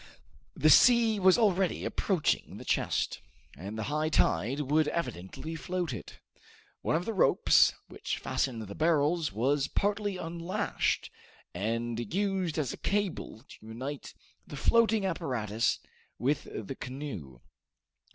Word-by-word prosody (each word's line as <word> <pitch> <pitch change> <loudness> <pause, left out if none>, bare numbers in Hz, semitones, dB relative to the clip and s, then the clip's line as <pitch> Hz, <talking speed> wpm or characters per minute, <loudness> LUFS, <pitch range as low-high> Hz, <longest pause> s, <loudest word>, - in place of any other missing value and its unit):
The - - +4
sea 235 -3 +6
was 190 -1 +6
already 195 -5 +1
approaching 185 -7 0
the - - -10
chest, - - 0 0.3
and 100 +9 -7
the 110 - -2
high 155 +5 -1
tide 130 - +1
would 150 +2 +2
evidently 150 - -4
float 175 -2 -3
it. 105 - -9 0.6
One - - 0
of 170 +2 -1
the 225 - -2
ropes 190 - +5
which - - -4
fastened 120 -5 -2
the 100 -1 -8
barrels 160 0 +2
was 135 +7 +1
partly 205 -1 -1
unlashed 170 +1 -2 0.4
and 115 +4 -2
used 190 -3 0
as 145 -5 -1
a - - -8
cable 195 - -2
to - - -14
unite 130 +6 -6 0.3
the 145 - -8
floating 225 +4 +3
apparatus 125 - -1 0.4
with 135 +5 0
the 110 +5 -5
canoe. 125 - -7
150 Hz, 130 wpm, -30 LUFS, 115-185 Hz, 0.6 s, sea